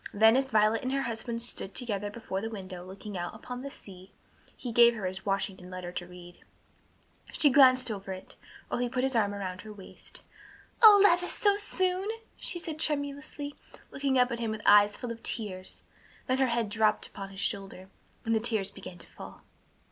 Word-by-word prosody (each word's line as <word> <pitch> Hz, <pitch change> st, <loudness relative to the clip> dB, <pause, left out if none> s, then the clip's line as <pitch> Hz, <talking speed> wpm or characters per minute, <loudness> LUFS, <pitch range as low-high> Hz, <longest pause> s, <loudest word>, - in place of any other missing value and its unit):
Then 220 Hz, +2 st, +6 dB
as 265 Hz, 0 st, +1 dB
Violet 215 Hz, -1 st, +3 dB
and 255 Hz, -, -3 dB
her 275 Hz, 0 st, 0 dB
husband 230 Hz, 0 st, -4 dB
stood 200 Hz, -4 st, -2 dB
together 205 Hz, -4 st, -2 dB
before 205 Hz, -3 st, -5 dB
the 225 Hz, -, -4 dB
window 185 Hz, -4 st, -8 dB
looking 195 Hz, +2 st, -9 dB
out 175 Hz, -1 st, -4 dB
upon 250 Hz, 0 st, -7 dB
the 280 Hz, -, -6 dB
sea, 190 Hz, -7 st, -12 dB, 0.5 s
he 245 Hz, -, -5 dB
gave 235 Hz, 0 st, +6 dB
her 210 Hz, -4 st, -5 dB
his 190 Hz, +2 st, -4 dB
Washington 195 Hz, -2 st, -2 dB
letter 185 Hz, -1 st, -6 dB
to 175 Hz, 0 st, -6 dB
read. 175 Hz, -1 st, -13 dB, 0.9 s
She 290 Hz, -, +4 dB
glanced 255 Hz, -3 st, +6 dB
over 195 Hz, -2 st, -6 dB
it, 185 Hz, 0 st, -9 dB, 0.3 s
while -, -, -2 dB
he 245 Hz, 0 st, 0 dB
put 255 Hz, 0 st, -1 dB
his 265 Hz, -1 st, 0 dB
arm 210 Hz, -3 st, +2 dB
about 185 Hz, -2 st, -5 dB
her 215 Hz, -, -10 dB
waist. 200 Hz, -3 st, -12 dB, 0.6 s
"O 425 Hz, -3 st, +10 dB
Levis, 355 Hz, -2 st, +4 dB
so 405 Hz, -1 st, +3 dB
soon!" 375 Hz, -1 st, 0 dB, 0.3 s
she -, -, 0 dB
said 320 Hz, -2 st, -6 dB
tremulously, 285 Hz, -1 st, -3 dB, 0.4 s
looking 275 Hz, -1 st, 0 dB
up 250 Hz, 0 st, +3 dB
at 235 Hz, -, -3 dB
him 230 Hz, -1 st, -2 dB
with 215 Hz, 0 st, -4 dB
eyes 205 Hz, 0 st, +6 dB
full 245 Hz, -2 st, -5 dB
of 230 Hz, 0 st, -8 dB
tears, 190 Hz, -5 st, -4 dB, 0.4 s
then 255 Hz, +1 st, 0 dB
her 265 Hz, -, +3 dB
head 235 Hz, -3 st, 0 dB
dropped 215 Hz, 0 st, +2 dB
upon 195 Hz, 0 st, -7 dB
his 195 Hz, 0 st, -10 dB
shoulder, 195 Hz, -2 st, -4 dB, 0.4 s
and 225 Hz, -, +1 dB
the 220 Hz, -, +3 dB
tears 215 Hz, -4 st, +1 dB
began 175 Hz, -, -10 dB
to -, -, -9 dB
fall. -, -, -12 dB
220 Hz, 195 wpm, -29 LUFS, 195-260 Hz, 0.9 s, O